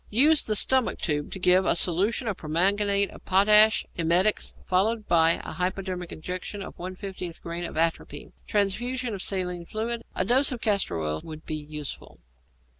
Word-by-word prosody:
_ - - -40
Use 290 +7 +5
the 215 - -1
stomach 260 +4 +2
tube 150 -3 -2
to - - -4
give 180 0 +4
a - - +2
solution 195 +8 0
of 210 - -1
permanganate 200 +5 +1
of - - -14
potash, 210 +3 +5
emetics, 175 +5 +1
followed 215 +4 0
by 165 -1 +4
a - - -7
hypodermic 180 +1 -4
injection 180 +4 -6
of - - -10
1/50 185 -1 -6
grain 170 +1 -4
of - - -7
atropine. 165 0 -2
Transfusion 240 +4 -1
of 195 - -6
saline 180 -3 -1
fluid. 230 +5 -4
A - - -1
dose 265 +4 +4
of 250 - -5
castor 200 - 0
oil 75 0 -3
would 155 -1 -10
be - - -5
useful. 150 -1 -7
190 Hz, 170 wpm, -26 LUFS, 170-215 Hz, -, Use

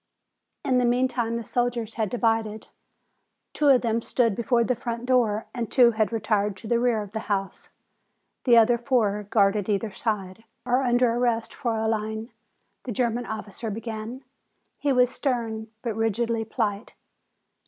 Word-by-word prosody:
In 255 -2 +3
the 250 - +2
meantime 240 -1 +1
the 235 - -4
soldiers 240 -1 -1
had 220 -3 -1
divided: 225 -2 -1 0.8
two 295 -1 +3
of 260 -3 +6
them 230 -1 0
stood 230 -2 +1
before 235 +1 +2
the 250 - +1
front 235 0 -5
door 230 -4 +2
and 235 -3 -4
two 245 -3 +6
had 220 -1 0
retired 210 -3 0
to 220 - -10
the 235 +1 +2
rear 235 -3 +1
of 200 - -11
the 220 - -3
house. 195 -1 -2 0.8
The 240 -3 +6
other 235 +1 +5
four 215 -5 0
guarded 205 -1 +2
either 210 +1 0
side. 195 -2 -3 0.3
"You - - -4
are 250 +2 +4
under 245 -1 +3
arrest, 235 -2 0
Fraulein," 220 -1 -2 0.5
the 250 - -5
German 240 +1 -1
officer 220 +1 -5
began. 225 +3 -6 0.6
He 285 - +1
was 250 -1 +4
stern, 230 -6 -2 0.2
but 230 -3 -2
rigidly 225 +1 0
polite. 210 -2 -3
230 Hz, 155 wpm, -25 LUFS, 215-245 Hz, 0.8 s, of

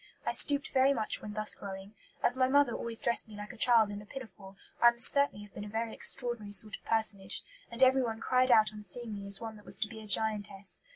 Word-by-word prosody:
I - - -1
stooped 285 -1 +5
very 270 +1 +2
much 220 -3 -3
when 210 - -8
thus 215 0 +3
growing. 195 +1 -10 0.3
As 245 - +2
my 260 0 +1
mother 280 -2 +2
always 230 -1 -4
dressed 235 - -1
me 215 - -13
like 210 +3 -9
a - - -14
child 225 -2 +3
in 205 0 -8
a - - -14
pinafore, 205 -7 -12 0.3
I 240 - +7
must 235 0 0
certainly 280 -7 -1
have 205 - -21
been 205 - -8
a 210 - -9
very 225 +1 -4
extraordinary 240 -5 0
sort 205 +1 +5
of - - -17
personage, 205 -4 +2 0.3
and 235 +2 0
everyone 255 -4 +1
cried 255 +2 +1
out 220 -2 +3
on 210 - -10
seeing 220 +3 -5
me 200 -1 -8
as 200 0 +2
one 225 -2 -8
that 210 - -18
was - - 0
to 215 - -1
be 220 -1 -11
a 215 - -13
giantess. 205 -2 -2
220 Hz, 245 wpm, -30 LUFS, 205-240 Hz, 0.3 s, I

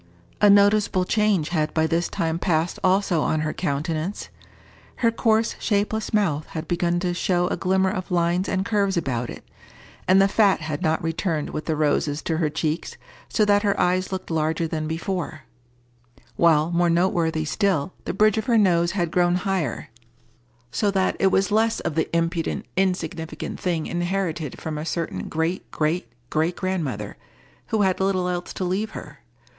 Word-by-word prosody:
A 205 - +7
noticeable 200 -2 +4
change 210 -6 +1
had 155 -3 -1
by 160 -1 +3
this 165 +2 0
time 165 0 -1
passed 170 -1 0
also 185 -3 +2
on 155 +1 0
her 155 0 -2
countenance. 160 +3 -3 0.7
Her 230 -1 +2
coarse 225 0 +2
shapeless 210 +1 0
mouth 170 -9 +1
had 160 0 -4
begun 175 0 0
to 180 -1 0
show 175 0 +1
a - - 0
glimmer 190 0 +1
of 185 -1 -4
lines 175 +1 +1
and 190 +1 0
curves 200 -3 +1
about 125 -7 -1
it, - - -10 0.6
and 185 +1 +6
the 195 - +5
fat 200 -3 +3
had 155 0 -4
not 160 -3 0
returned 165 -1 -2
with 155 - -4
the 160 - +1
roses 150 0 0
to 160 - -1
her 160 -2 +1
cheeks, 155 +2 -3 0.3
so 215 - +2
that 205 0 +4
her 205 -1 0
eyes 180 +1 +1
looked 185 -2 -5
larger 160 +1 0
than 155 -1 -3
before; 165 -1 -3 0.9
while, 160 -1 +3
more 175 0 +2
noteworthy 170 -2 +1
still, 185 -2 0
the - - -2
bridge 215 +1 +4
of 215 - -4
her 235 -2 +4
nose 175 -4 +3
had 175 -5 -1
grown 175 0 +3
higher, 180 - -2 0.8
so 200 - +1
that 190 -1 +1
it 195 - +4
was 195 +2 +2
less 225 +2 +2
of - - -2
the 160 +1 0
impudent, 165 0 -1
insignificant 165 -4 -2
thing 170 -4 -1
inherited 175 -4 -2
from 155 -1 -4
a - - -4
certain 165 - -3
great 165 +3 -2
great 160 +3 -1 0.2
great 160 +3 +1
grandmother, 155 - -3 0.5
who 215 -2 +1
had 190 -1 +1
little 190 -1 +1
else 180 0 -3
to - - -4
leave 195 +4 -2
her. 145 -1 -10
175 Hz, 170 wpm, -24 LUFS, 160-195 Hz, 0.9 s, A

